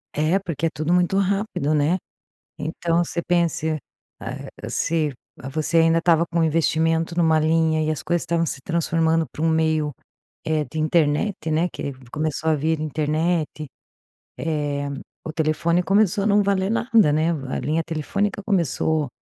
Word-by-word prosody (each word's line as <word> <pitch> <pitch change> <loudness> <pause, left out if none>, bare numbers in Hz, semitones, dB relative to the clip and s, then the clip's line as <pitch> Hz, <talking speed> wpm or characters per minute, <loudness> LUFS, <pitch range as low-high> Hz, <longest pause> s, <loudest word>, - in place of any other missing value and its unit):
É 155 +5 +2
porque 165 -4 -2
é - - -1
tudo 155 +2 -1
muito 180 +2 +2
rápido 195 -6 0
né? 150 +4 +2 0.6
Então, 165 +2 0
você 170 - -3
pense, 165 -3 0 0.4
hã, - - -7
se 155 -3 0 0.4
você 155 +3 +1
ainda 165 0 +4
estava 170 -1 +3
com 170 0 0
investimento 165 +1 +1
numa 160 -2 +4
linha 160 0 +2
e 155 - 0
as 155 - -2
coisas 170 +1 0
estavam 165 -1 0
se 140 - -3
transformando 165 -1 +1
para 155 - -6
um 165 - +3
meio, 160 -2 +1 0.5
eh, 155 -1 0
de 155 +4 -7
internet, 155 +5 +1
né, 165 +3 +2
que 140 - -4 0.2
começou 155 +1 -1
a 155 - +4
vir 155 +2 0
internet, 155 +1 -1 0.7
eh, 145 -3 -2 0.4
o 155 - -5
telefone 165 +2 +1
começou 200 +1 +2
a - - 0
não 205 0 +4
valer 195 0 +1
nada, 225 - +3
né, 160 +2 +2 0.2
a - - -2
linha 160 +3 0
telefônica 200 +6 -2
começou 160 - +1
160 Hz, 155 wpm, -23 LUFS, 155-175 Hz, 0.7 s, ainda